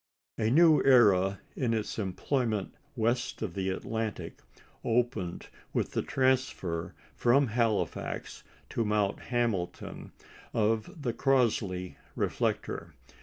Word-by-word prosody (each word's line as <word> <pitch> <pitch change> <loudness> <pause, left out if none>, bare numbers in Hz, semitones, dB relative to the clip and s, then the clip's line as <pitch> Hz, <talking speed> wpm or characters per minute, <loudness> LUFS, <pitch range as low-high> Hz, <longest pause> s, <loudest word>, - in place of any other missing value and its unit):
A 110 -1 +2
new 160 +4 +6
era 100 -7 +5
in 120 -3 0
its 110 0 -3
employment 110 +2 -1 0.2
west 120 +1 0
of 95 -6 -3
the 95 0 -1
Atlantic 110 +3 -4 0.4
opened 115 -7 -1 0.2
with - - 0
the - - 0
transfer 130 -11 0 0.2
from 135 +4 +4
Halifax 115 -1 -1 0.3
to 115 - 0
Mount 105 -2 +1
Hamilton 115 -8 -2 0.4
of 115 - 0
the 120 -4 0
Crossley 110 -10 +1 0.2
reflector. - - -2
115 Hz, 105 wpm, -30 LUFS, 100-125 Hz, 0.4 s, new